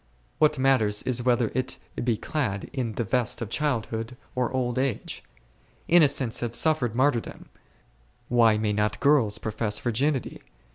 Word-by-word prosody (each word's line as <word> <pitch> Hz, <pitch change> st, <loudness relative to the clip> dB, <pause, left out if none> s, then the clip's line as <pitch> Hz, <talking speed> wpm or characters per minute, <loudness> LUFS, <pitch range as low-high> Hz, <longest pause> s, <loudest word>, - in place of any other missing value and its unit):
what 150 Hz, -1 st, +3 dB
matters 130 Hz, -6 st, +2 dB
it 125 Hz, -1 st, +1 dB
whether 120 Hz, -2 st, +1 dB
it 130 Hz, 0 st, -2 dB, 0.3 s
be 120 Hz, -3 st, +1 dB
clad 105 Hz, -11 st, -3 dB
in 120 Hz, -5 st, -2 dB
the 120 Hz, -, -2 dB
vest 120 Hz, +2 st, -1 dB
of 115 Hz, -2 st, -5 dB
childhood 115 Hz, -5 st, -2 dB, 0.2 s
or 125 Hz, -1 st, -1 dB
old 125 Hz, -1 st, -1 dB
age? 130 Hz, -4 st, -3 dB, 0.6 s
Innocents 145 Hz, -8 st, +3 dB
have 120 Hz, -1 st, -3 dB
suffered 125 Hz, -4 st, +1 dB
martyrdom, 130 Hz, -2 st, -1 dB, 0.8 s
why 115 Hz, -3 st, +4 dB
may 105 Hz, -1 st, 0 dB
not 105 Hz, 0 st, 0 dB
girls 130 Hz, -8 st, +3 dB
profess 110 Hz, -1 st, -2 dB
virginity 130 Hz, +5 st, -1 dB
120 Hz, 140 wpm, -26 LUFS, 110-135 Hz, 0.8 s, why